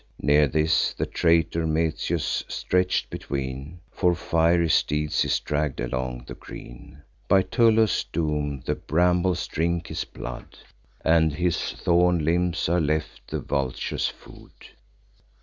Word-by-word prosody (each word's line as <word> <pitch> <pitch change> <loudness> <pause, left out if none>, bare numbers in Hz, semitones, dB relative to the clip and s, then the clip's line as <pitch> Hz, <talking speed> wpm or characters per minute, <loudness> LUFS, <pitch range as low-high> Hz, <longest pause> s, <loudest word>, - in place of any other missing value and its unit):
Near 75 0 +5
this, 80 +4 +2
the - - -2
traitor 85 0 +1
Metius, 80 0 -1
stretch'd 90 0 0
between 70 +4 -5
Four 90 -2 +2
fiery 85 0 +2
steeds, 75 0 +1
is - - +1
dragg'd 75 -2 -2
along 60 0 -3
the - - -8
green, 70 +4 -12 0.2
By 95 -1 +5
Tullus' 110 -2 +3
doom: 75 -4 -2
the - - +1
brambles 90 +2 +1
drink 85 +1 -1
his - - -3
blood, 60 0 -9 0.5
And 80 -1 +4
his 85 +3 -1
torn 85 -2 +3
limbs 85 +1 +1
are 85 +1 +2
left 75 0 -2
the - - -3
vulture's 70 -3 -2
food. - - -12
80 Hz, 125 wpm, -25 LUFS, 75-85 Hz, 0.5 s, Near